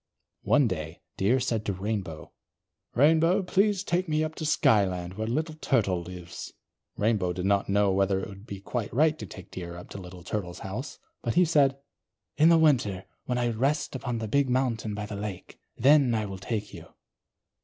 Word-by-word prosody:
One 145 -3 +4
day, 80 -6 -4 0.2
Deer 115 +7 +2
said 115 -3 -1
to 100 - 0
Rainbow: 95 -4 -4 0.6
"Rainbow, 160 - +4
please 195 +1 +2
take 180 -1 -1
me 155 0 +2
up 155 0 -3
to 160 -1 -4
Skyland 95 - +2
where 110 +3 -3
Little 155 +7 -1
Turtle 110 - +1
lives." 90 0 -8 0.4
Rainbow 105 -5 +1
did 90 +1 -4
not 100 0 +2
know 100 0 +3
whether 95 0 +2
it - - -5
would 100 +2 -12
be 100 -1 -7
quite 115 +1 -3
right 155 +5 +3
to 105 - -6
take - - -11
Deer 85 -2 -6
up 90 - -11
to - - -7
Little 90 -1 -10
Turtle's 90 -2 -4
house, 115 +9 -5 0.2
but 115 - -2
he 180 +1 +6
said: 140 -4 +3 0.6
"In 155 +2 +5
the 170 - +6
winter, 120 -12 +2 0.2
when 125 - -1
I 120 -1 +1
rest 135 +6 0
upon 125 -3 -3
the 110 -1 -3
big 140 +4 +2
mountain 120 -4 0
by 105 0 -4
the 105 - -6
lake, 100 -2 -7 0.2
then 135 -1 +5
I 110 -1 0
will 95 -2 -6
take 105 +1 -4
you." 85 -3 -10
110 Hz, 190 wpm, -27 LUFS, 95-140 Hz, 0.6 s, he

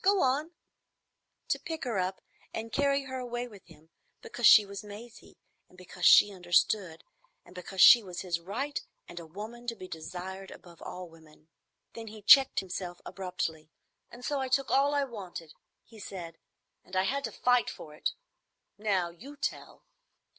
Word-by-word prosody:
Go 395 0 +4
on,"—to 295 +6 -5
pick 325 -1 -5
her 235 -7 -1
up 185 +1 -2 0.3
and 225 +1 -5
carry 280 +1 +1
her 260 -1 -5
away 245 0 -4
with 205 -5 -14
him, 160 -1 -19 0.3
because 240 -2 +2
she 210 - +9
was 200 +1 -8
Maisie, 215 +3 -12 0.3
and 180 - -21
because 180 -1 -1
she 205 - +8
understood, 175 -1 +1 0.4
and - - -16
because 185 +1 -4
she 240 - +10
was 180 -4 -7
his 175 -3 -2
right, 245 +12 -4 0.3
and 175 - -8
a 165 - -10
woman 220 +8 -9
to 230 - -2
be 185 -3 -9
desired 185 +4 -7
above 170 -2 -14
all 180 0 -7
women. 160 -1 -19 0.4
Then 225 -1 -8
he 215 -1 -10
checked 270 +5 +7
himself 180 -1 -6
abruptly. 165 -4 -4 0.4
"And 245 +1 -11
so 290 -1 -1
I 265 - -1
took 265 +1 +1
all 280 +2 +3
I 285 - +2
wanted," 185 - -8 0.3
he 225 -2 -16
said, 170 -5 -8 0.4
"and 185 - -11
I 185 - +3
had 275 +7 -1
to - - -4
fight 245 -1 +2
for 150 - -10
it. 150 - -2 0.7
Now 190 -5 0
you 265 +12 -12
tell." 290 - -5
200 Hz, 170 wpm, -30 LUFS, 175-245 Hz, 0.7 s, she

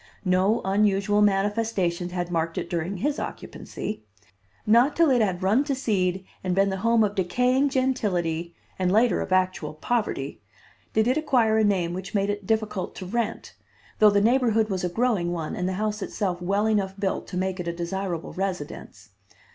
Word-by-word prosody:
No 190 +5 +2
unusual 200 +1 +2
manifestations 195 -3 +1
had 175 -1 -3
marked 165 -1 -1
it - - -4
during 175 +3 -2
his 285 +9 -1
occupancy. - - -6 0.6
Not 235 +6 +4
till 330 -4 +4
it 245 -3 +4
had 185 -3 0
run 215 +9 +3
to 280 -2 -1
seed 190 -7 0 0.2
and 185 -1 0
been 195 0 +3
the 190 - -2
home 230 +3 +3
of 205 -1 0
decaying 250 +9 +2
gentility, 180 -11 -1 0.2
and 185 -1 +1
later 220 -1 +3
of - - -5
actual 185 -5 0
poverty, 225 +8 -2 0.5
did 220 +1 +2
it 255 - +2
acquire 240 -8 +2
a - - +3
name 185 -5 +1
which 190 +3 -6
made 200 0 +1
it 205 -2 -6
difficult 215 -3 -1
to 185 - -7
rent, 230 +3 -3 0.5
though 215 - +8
the 200 0 +3
neighborhood 225 -1 +3
was 185 -2 -2
a 180 - 0
growing 205 -4 0
one 160 -3 -4
and 180 +1 -1
the - - -2
house 210 +2 -2
itself 180 -4 -2
well 200 +4 +1
enough 200 -3 0
built 195 -1 -2
to 180 - -5
make 185 0 -2
it 175 - -4
a - - 0
desirable 170 0 -4
residence. 150 - -5
195 Hz, 180 wpm, -25 LUFS, 180-220 Hz, 0.6 s, though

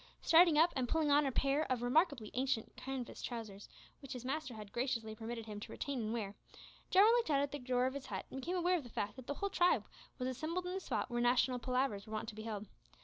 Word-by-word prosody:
Starting 330 -1 +6
up, 330 +3 +5
and 255 -3 -1
pulling 315 -2 +2
on 290 0 +5
a - - 0
pair 275 +3 +1
of 245 -2 0
remarkably 260 - +2
ancient 255 -3 -1
canvas 265 -2 -5
trousers, 215 -5 -6 0.3
which 275 - -7
his 250 -1 -7
master 275 -2 -3
had 210 -2 -9
graciously 235 -3 -1
permitted 225 +1 -6
him 210 -2 -6
to - - -8
retain 280 -2 -3
and 215 0 -2
wear, 215 -4 -3 0.6
Jarwin 410 +5 +7
looked 475 -5 +2
out 280 -2 +4
at 285 0 0
the 290 - -4
door 250 -1 +1
of 260 - 0
his 280 -1 -6
hut - - -4
and 265 - -5
became 350 +6 -2
aware 360 0 +3
of - - -9
the 240 - -10
fact 205 -2 -3
that 260 -2 -11
the 285 - -2
whole 400 +5 -2
tribe 355 -1 +3 0.3
was 255 - -2
assembled 315 +8 -2
in 360 - -3
the 380 - -2
spot 300 - -2
where 240 0 0
national 250 +1 +3
"palavers" 250 -5 -1
were 215 - -8
wont 215 +1 -3
to - - -8
be 215 - -7
held. 215 -2 -4
255 Hz, 255 wpm, -36 LUFS, 230-300 Hz, 0.6 s, Jarwin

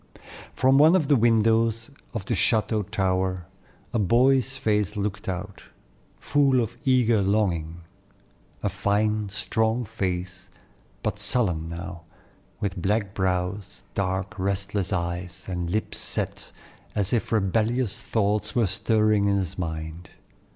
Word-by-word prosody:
Always - - -34
loyal. - - -16
From 130 +2 +4
one 160 +4 +7
of 160 -7 +2
the 145 - +6
windows 115 +1 +2 0.2
of 105 -5 -3
the - - -1
chateau 110 -1 +2
tower 95 -3 -1 0.5
a 115 - +1
boy's 130 +5 +3
face 105 -3 0
looked 100 -1 -3
out, 95 +2 -5 0.6
full 140 -3 +2
of 115 0 -2
eager 120 -5 +4
longing, 90 -5 0 0.8
a - - +1
fine, 105 0 0
strong 110 +3 0
face, 90 -4 -4 0.5
but - - -2
sullen 90 -10 0
now, 85 +1 -7 0.6
with 95 -3 -3
black 100 +1 0
brows, 95 +1 -2
dark, 95 0 -2
restless 100 +1 -1
eyes, 90 0 -3
and 90 -2 -3
lips 105 +4 -2
set, - - -3 0.4
as 100 0 +1
if 120 - 0
rebellious 110 +2 +1
thoughts 105 -1 0
were 120 -2 +3
stirring 105 +1 +2
in 100 0 +2
his 95 -2 -3
mind. 80 0 -5
100 Hz, 130 wpm, -25 LUFS, 95-115 Hz, 0.8 s, one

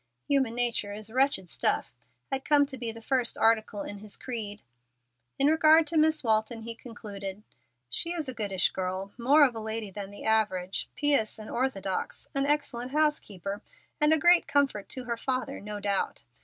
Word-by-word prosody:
"Human 265 -5 +2
nature 240 -4 +1
is 215 +1 -6
wretched 260 -7 +1
stuff," - - 0 0.4
had 270 0 -2
come 290 -1 +4
to 275 -1 -6
be 240 -3 -1
the 225 0 -12
first 255 -2 0
article 220 -2 +2
in 205 - -7
his 210 0 -7
creed. 215 -5 -4 0.7
In 275 - +2
regard 315 +1 +6
to 325 - -4
Miss 310 -1 +3
Walton 220 0 0
he 230 +1 -2
concluded: 210 -4 -7 0.4
"She 335 - -1
is 320 -5 -3
a 260 - -2
goodish 200 -5 0
girl, 185 +1 -3
more 280 +5 +5
of 255 - 0
a 225 - -5
lady 220 -1 -4
than 200 0 -6
the 205 - -10
average, 200 -4 0
pious 285 -7 +3
and 215 -1 -9
orthodox, 200 -7 -2
an 275 0 +1
excellent 265 -4 -1
housekeeper, 210 - 0 0.4
and 300 +1 +4
a 315 - +6
great 345 +2 +5
comfort 275 -8 +1
to 255 - -4
her 235 -1 -3
father, 255 0 -2
no 210 0 -6
doubt. 200 -1 -2
230 Hz, 180 wpm, -28 LUFS, 205-275 Hz, 0.7 s, regard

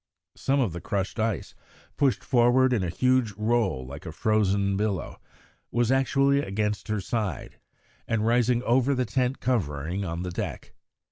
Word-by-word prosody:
Some 140 +1 0
of 115 -11 +1
the 85 - -6
crushed 100 +3 -3
ice, 110 - -1 0.4
pushed 140 -4 +1
forward 125 +1 +4
in 115 - +1
a 90 - -1
huge 125 +3 +1
roll 105 - 0
like 70 +7 -9
a - - -4
frozen 100 +2 +1
billow, 100 -4 -2 0.5
was 120 0 +1
actually 135 +1 +3
against 105 -3 -2
her 110 -1 -1
side 100 - -3 0.5
and 115 -1 0
rising 120 +1 +2
over 130 +3 +2
the 125 0 0
tent 125 +2 -1
covering 90 - -1
on 85 -1 -4
the 90 - -4
deck. 90 - -5
110 Hz, 155 wpm, -26 LUFS, 95-125 Hz, 0.5 s, forward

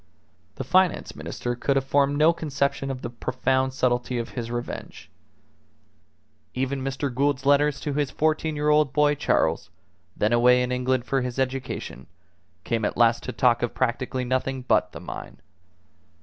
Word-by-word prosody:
The - - -4
Finance 185 -2 +2
Minister 120 0 -4
could 135 +3 0
have 135 -1 +1
formed 140 +1 +2
no 155 +3 +5
conception 140 -4 -2
of 130 -1 -5
the 120 - -3
profound 130 +2 0
subtlety 125 -1 0
of 115 -1 -3
his 120 -2 -5
revenge. 120 0 -6 1.4
Even 135 +1 -1
Mr. 135 0 -3
Gould's 140 +1 0
letters 145 0 +3
to 145 - -3
his 145 -1 0
fourteen 155 +1 0
year 150 0 0
old 150 -3 +3
boy 150 0 +4
Charles, 145 - 0 0.5
then 105 +3 +1
away 125 +1 +5
in 125 - -3
England 125 0 0
for 135 +2 0
his 125 0 -4
education, 130 - -3 0.6
came 115 -2 -1
at 105 - -1
last 115 -1 +4
to - - -3
talk 120 -2 +2
of 120 - -2
practically 130 0 -1
nothing 130 +1 -1
but 125 - +2
the - - -9
mine. - - -8
130 Hz, 165 wpm, -25 LUFS, 125-145 Hz, 1.4 s, no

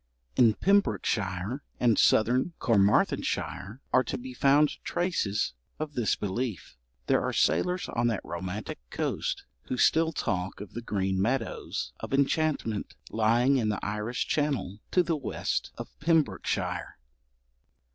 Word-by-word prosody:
In 115 -4 +5
Pembrokeshire 110 - +1 0.2
and 115 -3 +3
southern 125 +9 +3
Carmarthenshire 105 +1 +1
are 130 - +5
to - - -3
be 130 +1 -8
found 140 +4 +3
traces 105 - 0 0.2
of 155 -1 -4
this 120 -5 +1
belief. 105 0 -3 0.3
There - - +3
are - - -1
sailors 180 +1 +1
on 120 0 0
that 115 -4 -1
romantic 90 +4 -5
coast - - -2 0.2
who 130 - -2
still 160 +5 +4
talk 95 - -2
of 100 -2 -9
the 120 - -5
green 95 -4 -1
meadows 115 +2 -2
of - - -2
enchantment 140 -6 0 0.2
lying 120 +5 +3
in 110 -4 +1
the 105 - -2
Irish 105 +3 -2
channel 140 -10 -1
to 180 - +3
the 170 -1 0
west 135 -7 -2
of - - -6
Pembrokeshire. 160 -1 0
120 Hz, 130 wpm, -28 LUFS, 105-145 Hz, 0.3 s, In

